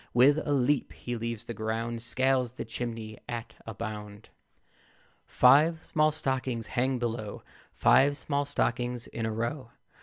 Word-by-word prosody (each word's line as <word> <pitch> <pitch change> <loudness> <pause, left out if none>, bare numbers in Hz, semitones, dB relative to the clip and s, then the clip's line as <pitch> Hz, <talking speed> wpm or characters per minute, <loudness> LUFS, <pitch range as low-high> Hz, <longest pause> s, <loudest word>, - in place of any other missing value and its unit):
With 140 +5 +6
a 145 - -2
leap 140 0 +1
he 120 - -5
leaves 115 -1 -4
the 120 0 -6
ground, 115 +2 -3
Scales 130 0 +1
the - - -6
chimney 115 -2 -5
at 120 -1 -5
a 110 - -6
bound. 105 -1 -7 1.0
Five 155 +6 +5
small 155 0 +2
stockings 130 -6 -2
hang 130 +2 0
below; 115 -3 -4 0.3
Five 140 +2 +5
small 145 -1 -1
stockings 125 -3 -1
in 115 -1 -4
a - - -2
row. 115 +3 -3
120 Hz, 145 wpm, -29 LUFS, 115-135 Hz, 1.0 s, With